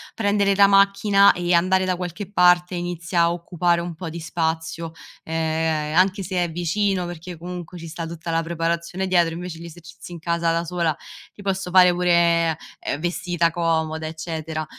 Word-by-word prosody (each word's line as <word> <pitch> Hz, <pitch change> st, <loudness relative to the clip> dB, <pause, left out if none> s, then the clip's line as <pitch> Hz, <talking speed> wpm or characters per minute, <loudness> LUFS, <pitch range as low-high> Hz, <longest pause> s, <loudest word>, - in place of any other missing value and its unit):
prendere 205 Hz, -2 st, +2 dB
la 200 Hz, +1 st, +7 dB
macchina 200 Hz, 0 st, +5 dB
e 175 Hz, 0 st, -1 dB
andare 185 Hz, +2 st, +3 dB
da 185 Hz, -1 st, 0 dB
qualche 180 Hz, +2 st, -6 dB
parte 180 Hz, -1 st, +4 dB
inizia 175 Hz, -1 st, -2 dB
a 170 Hz, 0 st, +3 dB
occupare 175 Hz, 0 st, 0 dB
un 170 Hz, 0 st, -5 dB
po' 165 Hz, +1 st, -7 dB
di 170 Hz, +2 st, -7 dB
spazio, 165 Hz, 0 st, -3 dB, 0.3 s
ehm, 160 Hz, -1 st, -1 dB
anche 190 Hz, +2 st, +3 dB
se 185 Hz, -1 st, -1 dB
è 170 Hz, -, -6 dB
vicino, 180 Hz, +3 st, 0 dB
perché 175 Hz, 0 st, -8 dB
comunque 175 Hz, +1 st, -8 dB
ci 165 Hz, -1 st, -8 dB
sta 165 Hz, +1 st, -6 dB
tutta 165 Hz, +1 st, -6 dB
la 165 Hz, 0 st, +1 dB
preparazione 170 Hz, +2 st, -2 dB
dietro, 175 Hz, -3 st, +2 dB
invece 175 Hz, -1 st, -7 dB
gli 170 Hz, -, -9 dB
esercizi 175 Hz, +2 st, -12 dB
in -, -, -7 dB
casa 170 Hz, 0 st, 0 dB
da 165 Hz, 0 st, 0 dB
sola, 170 Hz, -3 st, -1 dB, 0.3 s
ti 205 Hz, -, -14 dB
posso 195 Hz, -2 st, -2 dB
fare 180 Hz, 0 st, +6 dB
pure, 170 Hz, -2 st, +2 dB, 0.2 s
ehm, -, -, -3 dB
vestita 175 Hz, 0 st, 0 dB
comoda, 160 Hz, -1 st, -1 dB
eccetera; 160 Hz, -1 st, -5 dB
170 Hz, 175 wpm, -22 LUFS, 165-180 Hz, 0.3 s, la